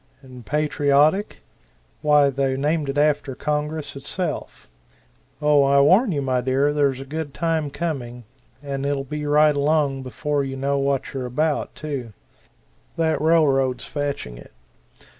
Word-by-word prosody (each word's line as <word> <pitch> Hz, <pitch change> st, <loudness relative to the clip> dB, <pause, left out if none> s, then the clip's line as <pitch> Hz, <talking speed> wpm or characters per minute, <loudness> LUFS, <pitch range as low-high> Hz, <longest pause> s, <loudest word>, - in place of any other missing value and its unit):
And 125 Hz, -2 st, -12 dB
patriotic? 150 Hz, -, +1 dB, 0.6 s
why 150 Hz, -2 st, +4 dB
they 135 Hz, 0 st, -1 dB
named 150 Hz, +1 st, 0 dB
it 135 Hz, -, -3 dB
after 145 Hz, -2 st, +1 dB
Congress 150 Hz, +1 st, -3 dB
itself. 155 Hz, +6 st, -5 dB, 0.7 s
Oh, 150 Hz, -1 st, +4 dB
I 140 Hz, 0 st, +4 dB
warn 195 Hz, -, +4 dB
you, 145 Hz, -4 st, -1 dB
my 130 Hz, -2 st, 0 dB
dear, 135 Hz, +3 st, +1 dB
there's 140 Hz, -3 st, +1 dB
a 135 Hz, -, -7 dB
good 150 Hz, 0 st, -5 dB
time 160 Hz, -3 st, -1 dB
coming, 135 Hz, -6 st, -4 dB, 0.4 s
and 140 Hz, -1 st, -4 dB
it'll 140 Hz, -1 st, -1 dB
be 150 Hz, +2 st, -5 dB
right 150 Hz, 0 st, +4 dB
along 145 Hz, -2 st, +1 dB
before 145 Hz, +3 st, -2 dB
you 135 Hz, -1 st, -4 dB
know 140 Hz, +1 st, 0 dB
what 140 Hz, -1 st, -1 dB
you're 130 Hz, -2 st, -3 dB
about, 150 Hz, +5 st, -1 dB
too. 140 Hz, -7 st, -5 dB, 0.8 s
That 160 Hz, -2 st, +1 dB
railroad's 140 Hz, -6 st, +2 dB
fetching 140 Hz, -, -4 dB
it. -, -, -15 dB
145 Hz, 140 wpm, -22 LUFS, 135-150 Hz, 0.8 s, why